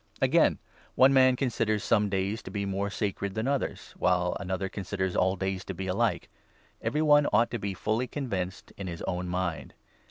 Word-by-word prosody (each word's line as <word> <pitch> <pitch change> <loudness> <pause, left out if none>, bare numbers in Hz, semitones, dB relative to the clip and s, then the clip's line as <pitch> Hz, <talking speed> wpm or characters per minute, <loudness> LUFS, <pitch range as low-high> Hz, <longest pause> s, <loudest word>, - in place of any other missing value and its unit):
Again, - - +4 0.4
one 135 +1 +6
man 130 -1 +6
considers 115 -5 0
some 105 0 +2
days 100 +3 -1
to - - -9
be 100 -1 -3
more 100 +1 -1
sacred 100 -1 -3
5 - - -15
than 110 +3 -1
others, 140 0 -2
while 90 -1 +2
another 95 0 -2
considers 95 -1 -3
all 95 +1 +2
days 95 0 -2
to 95 - -5
be 95 +2 -4
alike. 95 0 0 0.5
Every 150 +2 0
one 145 -1 +5
ought 115 - +3
to 120 - -2
be 100 -1 -3
fully 110 +6 -1
convinced 95 -10 -4
in 100 - -5
his 85 -2 -6
own 90 -1 -2
mind. 90 -2 -3
100 Hz, 190 wpm, -28 LUFS, 95-115 Hz, 0.5 s, one